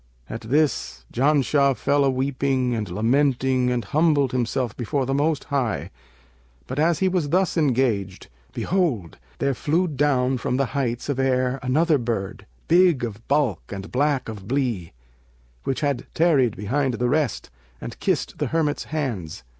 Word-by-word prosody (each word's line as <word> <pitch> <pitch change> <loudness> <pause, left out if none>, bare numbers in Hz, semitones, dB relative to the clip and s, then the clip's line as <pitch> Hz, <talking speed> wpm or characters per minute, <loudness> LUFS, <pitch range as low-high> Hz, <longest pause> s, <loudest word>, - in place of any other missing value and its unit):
At 115 - -6
this, 115 - 0
Janshah 140 0 +3
fell 140 0 +2
a 135 - +3
weeping 130 -1 0
and 110 -4 -3
lamenting 130 +4 +1
and 125 -1 -1
humbled 150 -4 +2
himself 125 -1 -1
before 130 +3 -1
the 135 - -1
Most 145 +2 +1
High; 120 - -2 0.7
but, 135 - -4
as 165 +1 +3
he 190 - +1
was 180 -6 0
thus 185 +3 +1
engaged, 125 - 0 0.2
behold, 145 - -1 0.2
there 140 0 0
flew 165 +7 0
down 135 -4 +1
from 125 +2 -1
the 135 - +2
heights 125 -4 -2
of 140 -2 -2
air 130 0 +1
another 150 +4 +2
bird, 115 -5 -4 0.2
big 175 -6 +4
of 115 -1 -6
bulk 140 - +1
and 100 0 -7
black 140 +1 +1
of 105 -4 -8
blee, 120 -10 -1 0.7
which 135 +3 -1
had 140 -4 -1
tarried 145 -9 +3
behind 130 +5 0
the 125 +2 0
rest, 145 - -1 0.3
and - - -8
kissed - - -1
the - - 0
hermit's 155 -3 0
hands. 120 - -4
135 Hz, 155 wpm, -23 LUFS, 120-145 Hz, 0.7 s, big